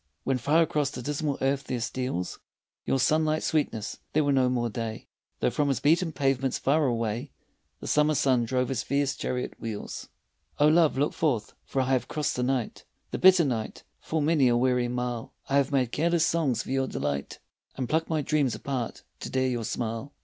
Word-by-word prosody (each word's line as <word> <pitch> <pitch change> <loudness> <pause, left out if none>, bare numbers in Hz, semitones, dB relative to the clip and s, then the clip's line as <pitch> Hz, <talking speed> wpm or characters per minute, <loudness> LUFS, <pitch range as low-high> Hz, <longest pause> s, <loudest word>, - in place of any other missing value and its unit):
When 135 -1 0
far 150 +7 +4
across 150 -3 0
the 125 - -7
dismal 145 +1 -1
earth 135 +1 0
there 125 - -2
steals 120 -5 -3 0.5
Your - - +1
sunlit 155 +3 +2
sweetness, 115 -9 -1
there 155 - +3
were 145 - +2
no 130 -2 +3
more 120 -1 0
day, 115 0 -5 0.4
Though - - +2
from 145 +5 0
his 135 - +1
beaten 165 +3 +3
pavements 135 -3 0
far 150 +2 +2
away 115 +2 -2 0.5
The - - -7
summer 150 0 +3
sun 130 -4 +3
drove 125 +1 0
his 130 -4 -1
fierce 140 0 0
chariot 125 0 -3
wheels. 110 -3 -6 0.5
Oh, 150 +1 +5
love 160 -3 +4
I - - +1
look 145 - +1
forth, 125 -10 0
for 135 - 0
I 130 - -1
have 130 -2 +1
crossed 150 -2 -1
the 125 - -1
night, 125 -2 -1 0.3
The - - -3
bitter 185 -3 +7
night, 115 -5 -3 0.2
full 160 -1 -2
many 145 -3 +3
a 120 -1 +3
weary 125 0 +2
mile, 125 -1 -4
I 140 - +2
have 140 0 +2
made 130 -4 +1
careless 170 +1 +2
songs 160 -8 +1
for - - -7
your 135 0 +1
delight 70 - -3 0.4
And 130 -2 -3
plucked 160 +5 0
my 155 -2 0
dreams 145 -4 +1
apart 130 -4 -4 0.2
to - - -6
dare 130 0 +1
your 120 -3 -2
smile. 115 +3 -3
135 Hz, 200 wpm, -27 LUFS, 120-150 Hz, 0.5 s, bitter